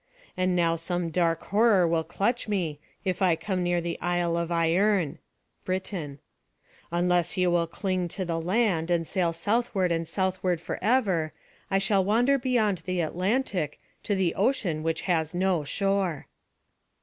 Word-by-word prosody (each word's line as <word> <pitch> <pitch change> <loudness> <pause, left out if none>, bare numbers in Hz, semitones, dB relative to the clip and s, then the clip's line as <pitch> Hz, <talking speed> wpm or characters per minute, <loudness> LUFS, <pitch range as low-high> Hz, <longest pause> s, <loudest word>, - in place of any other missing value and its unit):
And 185 0 +1
now 165 -1 +2
some 175 +1 -2
dark 165 -1 +1
horror 205 -4 +4
will 165 -1 +1
clutch 235 +9 -1
me, 175 -8 -1 0.3
if 185 -1 -1
I 180 -3 +4
come 185 +1 -2
near 175 0 +1
the 170 0 -4
Isle 175 -1 0
of 170 0 -1
Ierne.[A] 175 -1 -1 0.7
Unless 175 +1 +1
you 180 -1 +3
will 170 -1 +2
cling 185 0 -2
to 185 +2 -4
the 165 -1 -2
land, 180 -2 +1
and 170 -1 +1
sail 175 -1 0
southward 195 +1 0
and 165 -1 -1
southward 185 0 0
forever, 190 -5 0 0.4
I 195 - +2
shall 195 0 +2
wander 245 +8 +3
beyond 225 -7 +1
the 185 +1 -3
Atlantic, 180 - -1 0.2
to 205 - -1
the 185 -3 +1
ocean 195 - 0
which 165 0 -2
has 165 -2 0
no 180 -3 +1
shore." 195 -1 -1
180 Hz, 150 wpm, -27 LUFS, 165-195 Hz, 0.7 s, horror